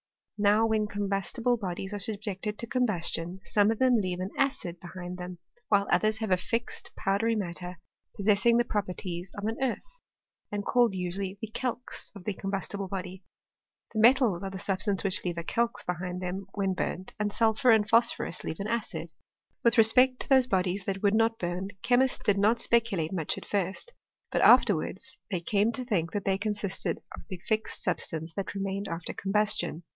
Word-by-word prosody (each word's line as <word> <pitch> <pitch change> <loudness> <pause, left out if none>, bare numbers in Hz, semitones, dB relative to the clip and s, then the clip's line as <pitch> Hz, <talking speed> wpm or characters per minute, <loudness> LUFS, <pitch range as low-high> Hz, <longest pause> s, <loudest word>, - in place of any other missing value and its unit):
Now 210 +2 +4
when 220 -1 +1
combustible 205 +4 -1
bodies 195 -1 -4
are 205 - -3
subjected 210 0 -3
to - - -4
combustion, 190 -7 -1
some 205 +1 +3
of 225 - +1
them 255 -1 +4
leave 185 -4 -1
an 185 +2 -3
acid 260 -11 -1
behind 180 +1 -7
them; 180 0 -6 0.3
while 200 -1 +3
others 215 0 +2
leave 220 -3 -2
a 185 - +5
fixed 230 +6 -3
powdery 215 +4 +1
matter, 180 -2 -2 0.4
possessing 210 +3 +3
the 240 - +3
properties 185 -4 -3
of 200 - -4
an 225 +1 -1
earth, - - -3 0.5
and 205 -1 -3
called 240 -5 +3
usually 185 +2 -3
the 220 -1 -6
calx 250 +1 -4
of 195 - -10
the 205 - -2
combustible 195 0 -3
body. 185 0 -6 0.7
The 220 - -1
metals 235 -6 +5
are 195 - -3
the 190 - -6
substances 195 0 0
which 190 -2 0
leave 175 -2 -2
a 170 - -3
calx 230 +2 -1
behind 180 0 -3
them 185 +2 -4
when 195 -2 +1
burnt, 185 0 -2
and 210 0 0
sulphur 225 +4 +3
and 220 -2 +5
phosphorus 225 -5 +2
leave 160 - -4
an 200 - -3
acid. 230 -1 -3 0.5
With 235 +1 +4
respect 250 +3 +5
to - - -6
those 260 -2 +6
bodies 190 -3 0
that 195 0 -3
would 200 0 +4
not 225 +1 +3
burn, 175 +1 -3 0.2
chemists 250 +1 +3
did 200 -1 +1
not 220 +4 +3
speculate 220 -9 +1
much 165 -5 -1
at - - -8
first; 200 - -1 0.4
but - - +1
after 240 -4 +7
wards 260 +11 -5
they 185 -5 -2
came 205 +5 +2
to 255 +2 -4
think 170 -9 -1
that 205 - -2
they 195 0 +1
consisted 205 -2 -2 0.2
of - - -10
the 185 - -5
fixed 220 0 -1
substance 160 0 -2
that 195 +3 -4
remained 195 0 -2
after 165 0 -4
combustion. 200 -4 0
200 Hz, 185 wpm, -29 LUFS, 185-225 Hz, 0.7 s, after